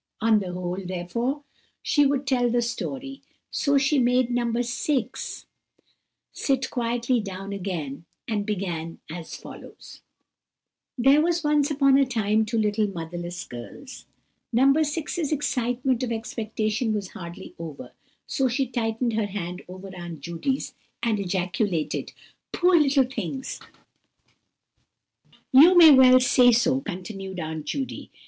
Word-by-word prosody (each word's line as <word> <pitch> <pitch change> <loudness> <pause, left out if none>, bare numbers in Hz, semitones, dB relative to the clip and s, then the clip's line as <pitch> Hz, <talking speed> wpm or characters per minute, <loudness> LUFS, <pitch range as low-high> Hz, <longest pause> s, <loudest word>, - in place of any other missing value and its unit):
On 220 -1 +4
the 185 -3 -4
whole, 180 +1 -4
therefore, 235 +11 -3 0.4
she 290 -2 +3
would 280 0 -1
tell 250 -3 +2
the 240 0 +1
story, 270 +4 -5 0.3
so 280 -1 +2
she 285 +1 +3
made 250 0 +2
No. 240 -1 0
6 240 +2 -2 0.9
sit 270 -2 -1
quietly 240 +1 0
down 195 -1 -6
again, 170 -7 -5 0.2
and 215 -3 -1
began 175 -6 -3
as 165 -1 -7
follows:— - - -12 1.0
"There 270 +4 +5
were 345 +2 +2
once 295 -1 +2
upon 275 -2 +4
a 275 - +4
time 220 -3 +1
two 230 +1 -1
little 210 0 +1
motherless 175 -1 -6
girls." 120 - -10 0.4
No. 245 +3 +3
6's 310 +1 -1
excitement 255 -3 0
of 250 -2 -2
expectation 220 0 -2
was 200 -3 -4
hardly 170 -1 -9
over, 160 -4 -8 0.3
so 270 -2 0
she 260 +3 0
tightened 235 -1 -1
her 215 -1 0
hand 180 -2 -5
over 185 +1 -10
Aunt 170 -4 -8
Judy's, 170 - -3 0.3
and 225 -3 +1
ejaculated:— 180 -4 -1 0.4
"Poor 360 0 +3
little 280 -4 +4
things!" 255 +1 -5 1.9
"You 320 +7 +8
may 325 -3 +10
well 255 -2 +8
say 250 -1 +5
so," 255 +3 +2
continued 190 -2 -6
Aunt 155 -2 -5
Judy. 270 - -4
230 Hz, 130 wpm, -25 LUFS, 185-265 Hz, 1.9 s, may